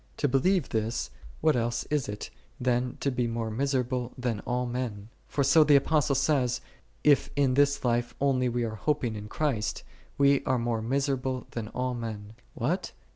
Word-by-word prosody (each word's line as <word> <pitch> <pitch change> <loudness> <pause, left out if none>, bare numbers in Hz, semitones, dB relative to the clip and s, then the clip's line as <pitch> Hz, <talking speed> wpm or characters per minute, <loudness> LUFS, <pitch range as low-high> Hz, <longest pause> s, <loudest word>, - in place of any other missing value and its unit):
To - - +1
believe 145 +6 +2
this, 110 - -2 0.3
what 155 -3 +4
else 120 0 0
is 145 -7 0
it, 105 0 -6 0.3
than 125 0 0
to 140 - +1
be 125 -1 0
more 115 -1 -2
miserable 125 0 -1
than 120 -4 -1
all 125 0 0
men? 120 -4 -4 0.2
For 140 - 0
so 145 +4 +6
the 150 -1 +5
Apostle 140 0 +3
saith, 130 -3 +2 0.3
" - - -35
If - - -1
in 140 -2 +3
this 140 0 +2
life 120 0 0
only 130 -2 +2
we 120 0 -1
are 110 -1 -2
hoping 130 -4 0
in 105 0 -6
Christ, 120 -3 -1 0.3
we 140 0 +4
are 130 - +2
more 115 -1 -1
misera 135 +4 0
ble 130 -1 -3
than 115 -2 -4
all 125 +2 -2
men." 110 -3 -6
s 120 - -29
What 160 +11 -1
125 Hz, 185 wpm, -28 LUFS, 115-140 Hz, 0.3 s, so